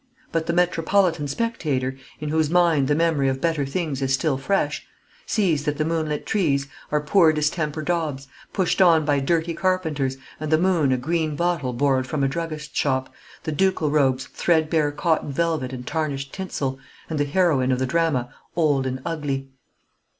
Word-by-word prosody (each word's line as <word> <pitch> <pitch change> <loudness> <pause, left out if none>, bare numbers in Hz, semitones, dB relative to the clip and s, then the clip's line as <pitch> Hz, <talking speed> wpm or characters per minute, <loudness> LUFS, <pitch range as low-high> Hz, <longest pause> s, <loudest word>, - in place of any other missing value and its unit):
But 160 -1 -1
the 170 - +1
metropolitan 175 -2 +2
spectator, 140 - -1 0.2
in 150 -1 -4
whose 155 -1 +1
mind 170 -5 +3
the 145 - +2
memory 160 -4 +2
of 130 0 -2
better 155 -3 0
things 145 -2 -2
is 135 -1 0
still 140 +2 +1
fresh, 150 +1 -1 0.4
sees 170 -9 +1
that 150 -1 -1
the 155 - 0
moonlit 155 -2 -1
trees 145 -9 +1 0.3
are 150 0 +2
poor 160 +2 +5
distemper 155 0 -1
daubs, 155 -5 -2 0.2
pushed 190 0 +1
on 165 -4 +5
by 145 -1 +2
dirty 165 +4 0
carpenters, 160 -7 0 0.2
and 155 0 -4
the 155 - +5
moon 170 -5 +2
a 130 - +2
green 155 +3 -1
bottle 170 -5 0
borrowed 130 +1 +1
from 140 +2 -1
a - - +3
druggist's 155 +1 -5
shop, 130 -2 0 0.3
the 155 - -2
ducal 160 -2 +1
robes 135 -3 +2
threadbare 160 -3 +1
cotton 150 0 0
velvet 155 -3 -1
and 125 -1 -7
tarnished 140 -3 -3
tinsel, 140 -8 -3 0.3
and 155 -2 -3
the - - +3
heroine 145 -5 +2
of 130 - +2
the 130 - 0
drama 135 -4 0 0.2
old 145 -5 +2
and 130 0 -4
ugly. 140 -5 -3
150 Hz, 170 wpm, -23 LUFS, 135-165 Hz, 0.4 s, poor